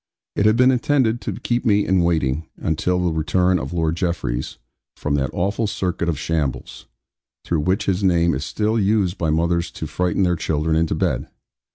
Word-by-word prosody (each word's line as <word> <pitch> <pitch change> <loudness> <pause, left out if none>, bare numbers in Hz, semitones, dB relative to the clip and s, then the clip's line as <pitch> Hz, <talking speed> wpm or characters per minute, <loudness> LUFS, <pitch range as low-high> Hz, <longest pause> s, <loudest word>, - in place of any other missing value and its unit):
It 105 - +3
had 110 - +4
been 125 +2 +5
intended 125 -2 +1
to - - -5
keep 120 0 -1
me 105 -4 +3
in 95 -1 +2
waiting, 80 -3 0
until 90 +3 0
the 85 - +1
return 90 +3 +1
of 65 -1 -5
Lord 80 -2 0
Jeffreys, 75 -9 -2 0.4
from 75 - -3
that 65 -2 0
awful 100 +5 -1
circuit 95 -4 -2
of 80 - -1
shambles, 75 -4 -3 0.6
through 85 - 0
which 90 +6 0
his 95 0 0
name 85 -3 +3
is 70 +1 -3
still 110 +7 0
used 100 -2 +1
by 80 - 0
mothers 85 +2 +1
to - - -6
frighten 90 +2 0
their 90 -1 +2
children 80 -1 -1
into 80 -1 +1
bed. 80 -6 -1
85 Hz, 185 wpm, -21 LUFS, 80-100 Hz, 0.6 s, been